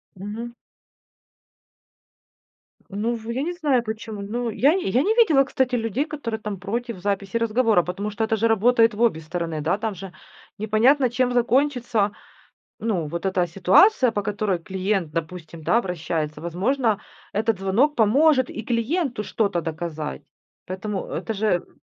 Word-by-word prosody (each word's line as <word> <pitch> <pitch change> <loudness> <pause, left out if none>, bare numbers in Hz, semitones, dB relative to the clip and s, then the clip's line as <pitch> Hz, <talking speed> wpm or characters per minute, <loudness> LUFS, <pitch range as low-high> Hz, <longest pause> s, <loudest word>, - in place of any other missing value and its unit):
Мгм. 215 +5 -7 2.3
Ну, 215 +4 -1
в 225 0 -8
я 250 +3 -2
не 340 +5 -2
знаю 290 -8 +1
почему, 220 -1 -6
но 230 +4 -3
я 275 +7 +3
я 260 - +1
не 425 +8 +1
видела, 325 - +5
кстати, 260 -1 0
людей, 230 +4 -1
которые 280 -8 -5
там 210 -3 -5
против 230 +2 -4
записи 200 +2 -1
разговора, 225 -4 +2
потому 200 +4 -4
что, 210 +2 -2
это 220 0 +1
же 225 +2 +2
работает 230 +1 +4
в 210 - -5
обе 220 -9 +2
стороны, 165 -1 -4
да, 160 +6 +1
там 215 -1 -3
же 190 0 -9 0.4
непонятно 235 +6 +3
чем 250 +1 +1
закончится. 245 -4 +1 0.7
Ну, 200 -8 -1
вот 170 +5 -4
эта 185 -2 +1
ситуация, 195 - +4
по 205 - -1
которой 205 -2 -1
клиент, 190 -1 -2
допустим, 165 0 -6
да, 225 - +3
обращается. 160 -6 -3
Возможно, 210 - 0 0.3
этот 215 0 0
звонок 225 +11 +2
поможет 260 +4 +4
и 225 - -6
клиенту 240 - -1
что-то 200 -6 0
доказать, 160 - -5 0.4
поэтому 190 +2 -4
это 225 - -4
же 215 +2 -1
м 175 - -13
215 Hz, 150 wpm, -23 LUFS, 190-245 Hz, 2.3 s, видела